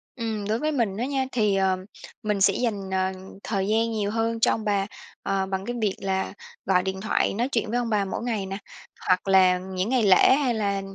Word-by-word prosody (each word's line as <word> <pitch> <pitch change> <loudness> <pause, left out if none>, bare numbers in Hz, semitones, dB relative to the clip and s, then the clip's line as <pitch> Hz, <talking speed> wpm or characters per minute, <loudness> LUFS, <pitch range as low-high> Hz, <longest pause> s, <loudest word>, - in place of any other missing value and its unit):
Ừm, 220 -4 -3
đối 220 +2 +1
với 305 +3 0
mình 230 -9 0
đó 230 - -1
nha, 270 0 0
thì, 210 -4 +2
ừm, 190 -1 +1 0.4
mình 210 -2 -1
sẽ - - +5
dành, 205 -6 -2
ờ, 190 0 +1 0.3
thời 195 -3 -1
gian 225 +2 +1
nhiều 210 -2 -1
hơn 225 +1 -1
cho - - +4
ông 220 - -2
bà, 200 -2 +1 0.4
ờ, 195 -1 0
bằng 190 0 -3
cái 240 - -3
việc 205 -3 +1
là 190 -1 -1 0.3
gọi 180 -1 +3
điện 190 0 -3
thoại 220 - +1
nói 235 +6 -1
chuyện 230 -3 0
với 235 - 0
ông 240 -1 -2
bà 210 -2 +1
mỗi 195 - -4
ngày 225 -5 -2
nè. 195 0 -4 0.5
Hoặc 185 +1 +2
là 185 -1 +5
những 185 +2 -3
ngày 255 -2 +2
lễ, 195 +5 +6
hay 270 -4 +1
là, 200 -3 -1
205 Hz, 230 wpm, -25 LUFS, 190-230 Hz, 0.5 s, lễ